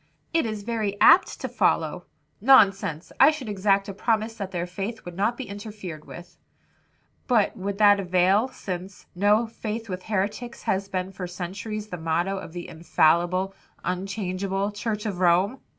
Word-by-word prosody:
"It 325 -7 +2
is 215 -2 -5
very 215 -3 -2
apt - - +6
to - - -2
follow." - - 0 0.4
"Nonsense! 200 - +4
I 270 - +9
should 305 -6 -4
exact 195 -1 +1
a 200 - -5
promise 220 +2 0
that 200 -4 -5
their 175 -2 -3
faith 195 +5 -6
would 175 -1 -8
not 210 +6 0
be 265 - -4
interfered 200 -6 -8
with." 175 0 -11 0.9
"But 235 -5 +2
would 200 -1 -4
that 205 -1 +6
avail, 185 +4 +3
since, 185 -6 -7
'No 205 +5 +3
faith 225 0 -5
with 185 0 -4
heretics,' 215 +4 -3
has 195 +1 0
been 185 -1 -3
for 185 -1 -6
centuries 195 +4 -5
the 180 - -5
motto 170 +4 -1
of 165 - -9
the 175 -1 -6
'infallible, 175 +3 +2 0.3
unchangeable,' 195 +1 -2
Church 210 0 -3
of 195 -4 -3
Rome?" 185 +8 +3
195 Hz, 160 wpm, -25 LUFS, 180-215 Hz, 0.9 s, I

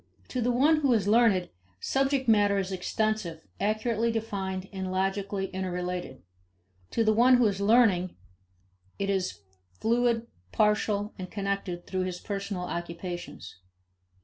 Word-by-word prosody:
To 255 - -2
the 245 +2 +2
one 290 +6 +4
who 280 -4 +3
is 210 -4 +1
learned, 210 -5 +4 0.3
subject 270 - 0
matter 205 -2 +4
is 195 -1 -2
extensive, 190 -3 -2
accurately 220 +2 0
defined, 195 -4 -3
and 190 -1 -4
logically 195 +1 -1
interrelated. 180 - -4 0.7
To 230 - +1
the 215 0 +3
one 245 +4 +6
who 245 - +4
is 200 -2 0
learning, 200 -5 +4 0.8
it 200 0 -1
is 185 - -2 0.4
fluid, 235 0 +2 0.3
partial, 210 0 +1
and 185 -1 -6
connected 195 -3 -3
through 185 -1 -2
his 180 -1 -4
personal 200 -2 -4
occupations. 175 0 -6
200 Hz, 130 wpm, -28 LUFS, 185-225 Hz, 0.8 s, one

